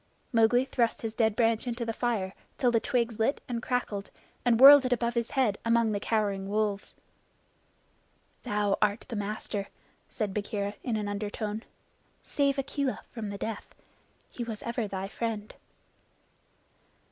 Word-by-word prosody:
Mowgli 235 +3 +4
thrust 240 -4 0
his 225 -1 -3
dead 220 -2 +2
branch 230 +1 +2
into 235 0 -2
the 225 - -2
fire 215 -6 -1 0.2
till 250 -4 +3
the 230 - +3
twigs 235 -3 -1
lit 225 +6 +2
and 235 -2 -3
crackled, 230 -6 -2 0.3
and 235 -2 +3
whirled 280 +1 +11
it 255 - -1
above 240 -1 +1
his 235 0 -1
head 240 -7 +1
among 230 -1 +3
the 205 - -1
cowering 200 -3 -1
wolves. 205 -1 -1 1.5
"Thou 210 -4 0
art 210 +1 +2
the 230 - -4
master," 205 -1 -3 0.4
said 210 -4 -3
Bagheera 205 0 -2
in 230 -3 -1
an 210 -1 -2
undertone. 210 +1 -3 0.6
"Save 280 -1 +1
Akela 275 0 -2
from 220 -4 -5
the 200 - -5
death. 220 +1 -5 0.6
He 240 - -5
was 225 -3 -6
ever 235 -2 -2
thy 195 -1 -4
friend." 215 0 -4
225 Hz, 150 wpm, -29 LUFS, 205-240 Hz, 1.5 s, whirled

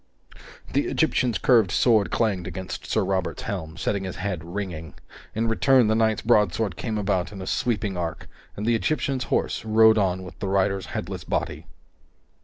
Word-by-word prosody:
The - - +1
Egyptian's 120 -4 +1
curved 115 -7 +4
sword 110 0 +3
clanged 100 -6 0
against 95 -1 -6
Sir 110 -3 +1
Robert's 95 -1 -2
helm, 85 -6 -5
setting 100 +2 -1
his 95 -2 -5
head 95 -4 -3
ringing. 85 -3 -6 0.4
In 115 +1 0
return, 125 +2 +4
the - - +3
knight's 110 -1 +1
broadsword 105 -3 +2
came 110 +3 -3
about 95 -3 0
in 100 - -9
a 95 - -6
sweeping 105 -2 -1
arc, 85 -2 -4 0.3
and 105 - -3
the 120 - +3
Egyptian's 135 +2 0
horse - - -1
rode 110 0 +5
on 95 -2 0
with 90 - -11
the 100 - -3
rider's 95 -1 +1
headless - - -5
body. - - -3
100 Hz, 170 wpm, -25 LUFS, 95-110 Hz, 0.4 s, rode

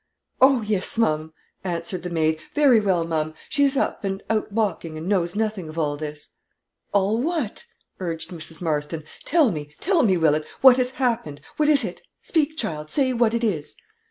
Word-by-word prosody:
"Oh, 260 -2 +6
yes, 210 0 -2
ma'am," 155 -8 +1 0.3
answered 175 0 -3
the 180 - -5
maid, 160 -2 +1 0.2
"very 280 -6 +6
well, 185 -5 +1
ma'am; 155 -1 -2
she 285 -1 +3
is 275 0 +1
up, - - -1
and 195 0 -3
out 215 -1 0
walking 190 -7 -1
and 160 +3 -6
knows 180 -2 +1
nothing 210 -6 -2
of 155 - -10
all 150 -3 0
this." 150 0 -7 0.6
"All 200 +3 +2
what?" 315 - -2 0.3
urged 165 -2 -4
Mrs. 165 0 -8
Marston. 155 0 -2 0.2
"Tell 310 -7 +4
me, 150 -3 -6
tell 360 -2 +2
me, 195 -8 +3
Willett, 155 -2 +2
what 260 -1 +8
has 250 -1 +2
happened. 230 - -1 0.2
What 300 -1 +3
is 295 -2 +5
it? - - -5 0.2
Speak, 315 -1 0
child; 155 - -3
say 265 -3 +2
what 235 -1 +2
it 235 - -1
is?" 170 -10 -1
190 Hz, 185 wpm, -23 LUFS, 160-245 Hz, 0.6 s, what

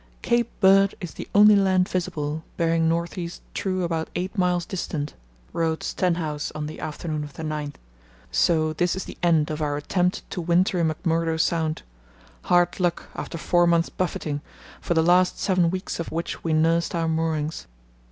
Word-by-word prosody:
"Cape 235 -1 +2
Bird 195 0 +5
is 175 -5 -6
the - - -7
only 210 +1 +8
land 190 -2 +3
visible, 160 -4 -3
bearing 165 -1 +2
north 170 +2 -1
east 170 0 -6
true 185 -1 -1
about 165 -2 -2
eight 185 +4 -3
miles 180 -3 +1
distant," 155 -5 -4 0.4
wrote, 160 -1 -1
Stenhouse 165 -5 -1
on 155 -1 -3
the 155 - -7
afternoon 155 0 -4
of 145 -1 -9
the 160 - -7
9th. 150 -2 -4 0.6
"So 155 -2 +2
this 175 +3 0
is 190 - -3
the - - -9
end 160 -3 +3
of 155 0 -4
our 145 -1 0
attempt 180 +5 -1
to 180 - -3
winter 175 +2 +2
in 165 - +2
McMurdo 165 0 0
Sound. 160 -1 0 0.6
Hard 175 +1 +3
luck 175 -2 -1
after 170 - -5
four 175 +1 +3
months' 170 -1 +3
buffeting, 155 -5 -3 0.4
for 170 - -1
the 160 - +4
last 180 +2 +4
seven 185 -3 +2
weeks 185 +1 -4
of 170 - -4
which 165 +1 -4
we 165 - -1
nursed 165 +2 +2
our 165 -1 0
moorings. 160 -1 -1
170 Hz, 175 wpm, -24 LUFS, 160-180 Hz, 0.6 s, only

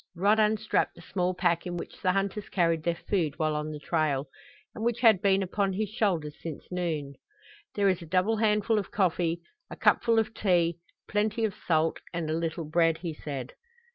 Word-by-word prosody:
Rod 205 +5 +3
unstrapped 215 0 +1
the 170 - -13
small 180 0 -1
pack 175 -1 +1
in 175 0 -3
which - - -8
the 185 -2 +2
hunters 195 +1 -2
carried 165 -3 +2
their 170 +1 0
food 165 -5 -1
while 155 -1 0
on 150 0 -2
the 155 - -5
trail, 150 -3 0 0.5
and 220 - -6
which 235 0 0
had 220 -6 +6
been 195 -1 +3
upon 195 +1 0
his 210 +1 -1
shoulders 185 -9 0
since 160 -3 -6
noon. 160 -6 -2 0.6
"There 200 -1 +2
is 185 -3 +2
a 170 - -9
double 185 +6 +2
handful 215 0 +2
of 200 - -5
coffee, 175 -3 0 0.3
a - - -7
cupful 230 -1 +3
of 220 0 +1
tea, 175 -5 +1 0.3
plenty 215 +2 0
of 210 - -2
salt 160 -1 +2 0.2
and 160 -2 -2
a - - +1
little 165 0 -2
bread," 165 +1 +2
he 165 -1 -5
said. 140 -4 -6
180 Hz, 195 wpm, -28 LUFS, 165-205 Hz, 0.6 s, had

